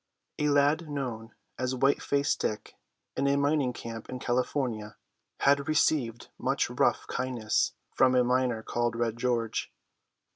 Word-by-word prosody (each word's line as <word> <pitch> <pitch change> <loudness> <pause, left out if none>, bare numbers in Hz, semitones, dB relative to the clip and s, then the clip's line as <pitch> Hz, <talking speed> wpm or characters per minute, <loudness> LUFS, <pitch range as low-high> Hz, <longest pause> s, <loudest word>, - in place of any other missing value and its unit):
"* - - -21
[A - - +3
lad 145 +3 +3
known 120 -6 -5 0.2
as 130 0 -1
White 135 +2 +2
faced 140 0 +1
Dick 105 -1 -3 0.4
in 140 - +1
a 140 - +3
mining 140 -2 +2
camp 115 -2 -8
in 130 - -4
California 120 -4 -2 0.4
had 140 +1 +3
received 140 -6 +1
much - - 0
rough - - +1
kindness 125 -4 0 0.2
from 130 -1 +4
a 125 - +5
miner 125 -2 +1
called 120 0 -1
Red 115 -1 -1
George. 120 -2 -1
125 Hz, 145 wpm, -29 LUFS, 115-140 Hz, 0.4 s, a